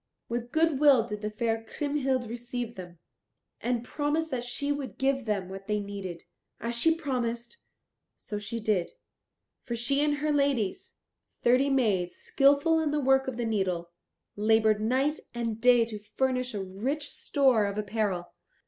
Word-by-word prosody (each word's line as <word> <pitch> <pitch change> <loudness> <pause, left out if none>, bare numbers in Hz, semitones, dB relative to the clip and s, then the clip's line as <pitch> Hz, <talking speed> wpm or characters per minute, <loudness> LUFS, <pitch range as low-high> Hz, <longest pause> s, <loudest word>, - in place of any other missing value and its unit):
With 240 +1 -3
good 320 -3 +2
will 280 -6 +6
did 210 -2 -6
the 210 - -2
fair 225 +1 -1
Kriemhild 270 -1 -1
receive 240 0 -5
them, 175 -4 -10 0.6
and 240 -1 -1
promised 300 +4 -1
that 245 -2 -2
she 280 +4 -1
would 285 -2 -4
give 270 -1 +1
them 200 -4 -1
what 195 +1 -9
they 210 -1 0
needed. 200 -4 -6 0.4
As 235 +1 -3
she 320 +8 +3
promised, 245 - -3 0.6
so 210 -2 -5
she 225 +3 -4
did; 210 -5 0 0.7
for 235 - -3
she 275 +5 +2
and 295 -1 +2
her 300 +1 -1
ladies, 280 -9 0 0.5
thirty 255 +3 +4
maids 205 -10 +1
skilful 285 +4 +3
in 315 -2 0
the 295 0 0
work 265 -1 +3
of 260 -3 -3
the 240 - -1
needle, 185 -6 -1 0.4
laboured 215 0 +3
night 265 +7 +1 0.2
and 230 -2 -3
day 245 -2 +6
to 215 -2 -7 0.2
furnish 255 -2 0
a 200 - -2
rich 245 +11 -3
store 260 -7 +2
of 200 +1 -4
apparel. 205 -4 -2
240 Hz, 160 wpm, -28 LUFS, 210-275 Hz, 0.7 s, will